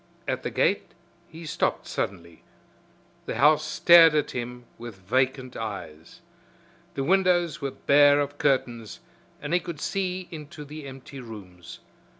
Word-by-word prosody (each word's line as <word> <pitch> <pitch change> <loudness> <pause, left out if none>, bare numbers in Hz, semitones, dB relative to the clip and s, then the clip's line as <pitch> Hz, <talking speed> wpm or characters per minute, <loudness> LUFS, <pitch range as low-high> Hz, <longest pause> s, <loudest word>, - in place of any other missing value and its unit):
At - - -1
the - - -3
gate - - 0 0.3
he 165 +1 -11
stopped 160 +1 -1
suddenly. 85 -4 -5 0.9
The - - -3
house 150 +1 +4
stared 165 +1 +6
at 150 - 0
him 125 0 -6
with 120 -2 -8
vacant 130 +6 -1
eyes. 85 -7 -7 0.7
The 135 - -1
windows 175 -2 +2
were 140 - -2
bare 145 +1 +4
of 145 0 -3
curtains 120 -6 -1 0.4
and - - -3
he 180 - +4
could 170 -3 -7
see 185 +1 -2
into 150 -2 -9
the 150 0 -9
empty 135 +1 -10
rooms. 95 -8 -11
140 Hz, 140 wpm, -26 LUFS, 120-155 Hz, 0.9 s, stared